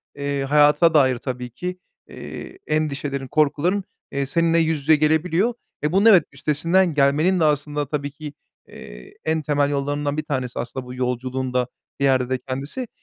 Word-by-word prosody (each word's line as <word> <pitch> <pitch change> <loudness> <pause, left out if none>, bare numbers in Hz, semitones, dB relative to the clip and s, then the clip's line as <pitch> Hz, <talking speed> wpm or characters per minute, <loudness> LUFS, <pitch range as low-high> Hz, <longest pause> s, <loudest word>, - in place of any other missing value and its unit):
eee, 140 -1 -2
hayata 150 +3 +4
dair 130 -4 +4
tabii 125 -1 -5
ki, 180 +9 -6 0.3
eee, 380 - -9
endişelerin, 140 -3 -2
korkuların, 155 +7 +1 0.3
eee, 140 0 -1
seninle 165 +4 +2
yüz 160 -2 +1
yüze 155 +2 +5
gelebiliyor. 165 +9 +2 0.3
Eee, 150 - +1
bunun 195 +4 +3
evet, 200 -6 +7
üstesinden 165 +5 +1
gelmenin 150 +6 +3
de 160 - +3
aslında 145 -1 0
tabii 145 -2 -3
ki, 150 0 -9 0.3
eee, - - -12
en 160 0 +1
temel 145 -1 +1
yollarından 145 +1 -2
bir 155 - -1
tanesi, 130 -5 -3
aslında 125 +1 -5
bu 125 - -8
yolculuğun 130 +1 -3
da 125 -1 +1 0.3
bir 140 - +2
yerde 130 -2 +2
de 130 - 0
kendisi. 135 - -5
145 Hz, 165 wpm, -22 LUFS, 135-160 Hz, 0.3 s, evet